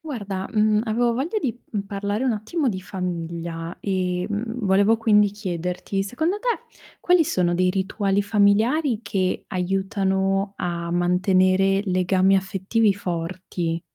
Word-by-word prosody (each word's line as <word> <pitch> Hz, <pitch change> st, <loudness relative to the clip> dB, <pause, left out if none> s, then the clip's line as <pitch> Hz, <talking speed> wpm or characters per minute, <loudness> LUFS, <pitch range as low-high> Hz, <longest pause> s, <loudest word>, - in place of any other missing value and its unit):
Guarda, 205 Hz, -, -5 dB
mhmm, 215 Hz, -1 st, +3 dB
avevo 235 Hz, +1 st, +1 dB
voglia 290 Hz, -, -1 dB
di, 245 Hz, -, -2 dB, 0.2 s
mhmm, 205 Hz, -3 st, -1 dB
parlare 205 Hz, +3 st, -3 dB
un 260 Hz, -, +2 dB
attimo 255 Hz, +8 st, -1 dB
di 190 Hz, -5 st, -3 dB
famiglia 170 Hz, -2 st, -5 dB
e, 185 Hz, -2 st, -1 dB
mhmm, 225 Hz, +2 st, -3 dB
volevo 200 Hz, +3 st, +4 dB
quindi 210 Hz, -2 st, +4 dB
chiederti, 185 Hz, -1 st, -3 dB
secondo 315 Hz, -, -1 dB
te -, -, -3 dB, 0.5 s
quali 355 Hz, -2 st, +4 dB
sono 180 Hz, -, +1 dB
dei 185 Hz, +1 st, +2 dB
rituali 195 Hz, +1 st, 0 dB
familiari 220 Hz, +6 st, +2 dB
che 190 Hz, -3 st, -1 dB
aiutano 195 Hz, +1 st, 0 dB
a 170 Hz, -1 st, -3 dB
mantenere 185 Hz, +2 st, +3 dB
legami 185 Hz, 0 st, +3 dB
affettivi 195 Hz, +3 st, +1 dB
forti? 170 Hz, -2 st, -3 dB
195 Hz, 130 wpm, -23 LUFS, 185-215 Hz, 0.5 s, volevo